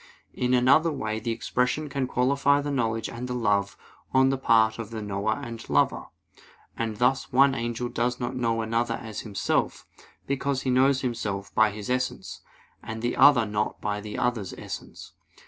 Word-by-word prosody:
In 125 0 +1
another 135 +7 +4
way 110 -6 -3
the 120 - -4
expression 125 +6 -1
can 140 -2 -2
qualify 140 +3 +2
the 145 0 -3
knowledge 115 -4 -1
and 120 +2 -6
the 125 - -3
love 100 -4 0 0.4
on 130 0 +5
the 135 - 0
part 110 -3 +3
of 115 -2 -5
the 115 -1 -6
knower 105 +1 -1
and 115 -3 -8
lover. - - +1 0.7
And 110 -2 -3
thus 125 +3 +1
one 135 +2 +5
angel 120 0 -3
does 120 0 -1
not 120 -1 -3
know 115 -2 0
another 115 +1 0
as 110 -2 -7
himself, 105 -3 -1 0.4
because 140 0 -1
he 130 - 0
knows 130 +1 +3
himself 100 -6 -3
by 110 -1 +4
his 105 0 -7
essence, 125 0 -3 0.4
and 110 0 -7
the 120 - 0
other 135 -4 +6
not 105 0 -2
by 105 0 -3
the 105 0 -7
other's 120 -6 -1
essence. - - -8
120 Hz, 175 wpm, -26 LUFS, 110-130 Hz, 0.7 s, other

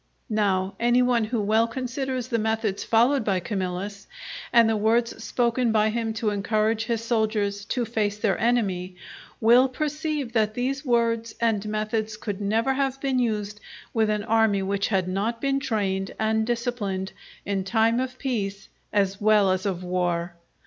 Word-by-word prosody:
Now, 195 -3 +1
any 240 +1 +3
one 245 -3 +2
who 230 +1 -2
well 220 +3 +3
considers 255 +1 -3
the 230 -3 0
methods 220 -2 -1
followed 240 +4 +3
by 195 -3 +1
Camillus, 195 +1 -4 0.4
and 235 -2 +6
the 225 - +2
words 225 +2 +1
spoken 235 +1 +1
by 215 0 +3
him 225 0 -1
to 220 -2 0
encourage 215 +2 0
his 230 -1 -2
soldiers 215 -3 0
to 245 +3 -1
face 210 -2 -1
their 205 -3 +1
enemy, 190 -7 0 0.4
will 245 +4 +5
perceive 300 -2 -3
that 215 -2 +1
these 270 +2 -2
words 230 -3 0
and 225 -3 +1
methods 215 0 -2
could 210 -2 -5
never 225 +6 +1
have 270 0 -1
been 270 -2 0
used 210 -3 -1 0.3
with 220 -2 +2
an 210 -1 0
army 220 -3 +2
which 200 +1 0
had 190 -4 0
not 205 +5 -1
been 275 +1 0
trained 200 -7 -2
and 220 0 +1
disciplined 230 -6 -2 0.3
in 195 -1 -1
time 225 +4 +2
of 255 0 -3
peace 200 -8 -3 0.2
as 195 -1 0
well 210 -2 +4
as 185 +2 -1
of 185 -2 -3
war. 175 -1 -1
220 Hz, 165 wpm, -25 LUFS, 200-235 Hz, 0.4 s, and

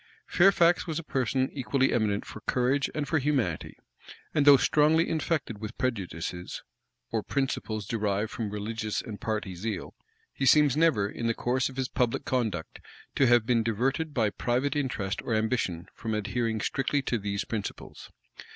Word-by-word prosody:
Fairfax 175 -2 +4
was 160 -2 -2
a 165 - -3
person 130 -2 0
equally 135 0 +1
eminent 105 -3 0
for 110 - -9
courage 130 +3 +1
and 150 -2 -2
for 160 +2 +2
humanity; 130 - -1 0.6
and 145 -1 +2
though 140 -1 +10
strongly 155 +4 +3
infected 155 - -1
with 110 0 -7
prejudices, 90 -7 -3 0.5
or 110 - 0
principles 110 -5 -2
derived 105 -1 -1
from 110 -3 -3
religious 105 +1 -3
and 105 -2 -8
party 110 -4 -2
zeal, 100 +2 -4 0.4
he - - -4
seems 145 +1 +5
never, 150 -11 +3
in 115 +2 -4
the 115 - +1
course 130 +2 0
of 130 - -12
his 130 -1 0
public 125 -2 -1
conduct, 110 -11 -2 0.3
to 135 - +3
have 120 -2 +5
been 120 -1 +3
diverted 130 +8 0
by 115 -7 +1
private 125 +6 0
interest 110 -9 -2
or 115 - -1
ambition 110 -7 -1
from 110 -2 -3
adhering 110 +1 -1
strictly 135 +4 0
to 120 -3 -1
these 100 0 -2
principles. 105 -3 -6
120 Hz, 160 wpm, -28 LUFS, 105-140 Hz, 0.6 s, though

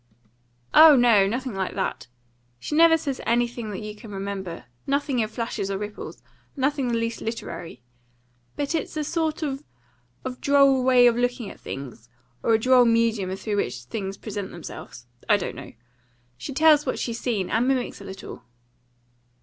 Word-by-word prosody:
"Oh 310 -1 +9
no; 230 -6 +5
nothing 250 +3 -3
like 190 -1 -3
that. 190 - -3 0.5
She 295 - -6
never 325 0 +7
says 280 -4 -4
anything 235 -1 0
that 200 -1 -5
you 210 0 -6
can 210 +1 -12
remember; 195 -5 -5 0.2
nothing 275 -2 0
in 220 - +1
flashes 220 -3 -4
or 195 - -1
ripples; 210 +1 -7 0.3
nothing 275 -1 0
the 235 - 0
least 230 0 -2
literary. 170 - -6 0.7
But 290 +2 -2
it's 320 -1 -3
a 305 - 0
sort 320 0 -1
of 275 -1 -3 0.8
droll 275 -2 +4
way 250 -1 +6
of 240 -1 +4
looking 245 -3 -1
at - - -14
things; 125 -4 -8 0.3
or 225 - +3
a - - +2
droll 255 +1 +5
medium 230 -5 +1
through 205 +1 -3
which 120 -9 -2
things 195 - -5
present 205 -3 -5
themselves. 155 -6 -10 0.2
I 205 - +6
don't 195 - -4
know. - - -10 0.6
She 125 - -7
tells 305 +1 +5
what - - -1
she's 230 -1 -3
seen, 210 -7 -2
and 230 +3 +2
mimics 260 -5 -1
a - - -9
little." 190 -9 -9
230 Hz, 165 wpm, -25 LUFS, 195-265 Hz, 0.8 s, Oh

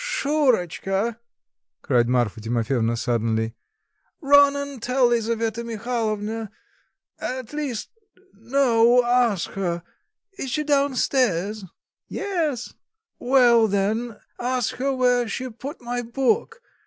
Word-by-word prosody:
"Shurotchka!" 235 - 0 0.6
cried 120 -3 +2
Marfa 120 -3 0
Timofyevna 115 +1 0
suddenly, 115 -1 -1 0.7
"run 285 -2 +5
and 280 -3 -5
tell 250 +2 +2
Lisaveta 230 -1 -1
Mihalovna, 225 -2 -3 0.7
at 255 0 -5
least, 285 -7 -4 0.4
no, 240 +1 +3
ask 240 -6 +1
her... 175 -3 -3 0.6
is 265 - -3
she 300 +4 -1
down 285 -2 +1
stairs?" 215 -6 0 0.4
"Yes." 320 - -2 0.5
"Well, 240 -3 +5
then; 210 +3 -1 0.2
ask 250 -1 -1
her 275 +3 0
where 250 -2 +2
she 255 +3 -4
put 270 +7 -8
my 245 0 -2
book? 345 - -1
235 Hz, 105 wpm, -23 LUFS, 205-265 Hz, 0.7 s, run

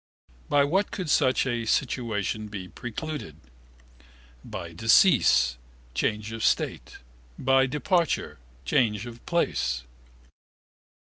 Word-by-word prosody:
By 145 -1 +4
what 190 +8 +1
could 180 -6 -3
such 130 -2 +3
a 120 -3 -2
situation 110 -4 -1
be 100 -3 -7
precluded? 120 - -6 1.1
By - - -7
decease 60 -1 +4 0.3
(change 105 - -1
of 115 -1 -5
state): - - 0 0.4
by 135 0 +3
departure 165 - 0 0.3
(change 110 -6 +1
of 120 -1 -10
place). 65 - 0
120 Hz, 100 wpm, -26 LUFS, 105-145 Hz, 1.1 s, By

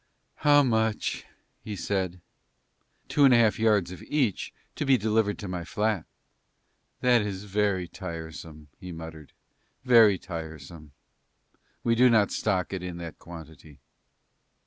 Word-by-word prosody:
"How 145 0 +5
much?" 110 -3 0 0.4
he 110 -2 -5
said. 95 -1 -2 0.9
"Two 145 - +2
and 135 -3 +7
a - - +6
half 115 -2 +3
yards 105 -5 +2
of 90 - -9
each, 135 -10 -1 0.2
to - - -2
be 135 -2 +4
delivered 110 -1 +1
to 100 - -7
my 90 -1 -4
flat." 105 +1 -1 1.0
"That 125 -2 +4
is 100 -2 -4
very 100 -3 0
tiresome," 80 -4 -8
he 90 - -8
muttered, 80 -2 -9 0.5
"very 115 -6 +6
tiresome. 80 -3 -9 0.9
We 115 -2 +2
do 125 +2 +5
not 110 -4 +3
stock 95 -3 -1
it 95 - -3
in 90 -1 -6
that 85 -2 -8
quantity." 80 -4 -12
95 Hz, 135 wpm, -27 LUFS, 85-110 Hz, 1.0 s, and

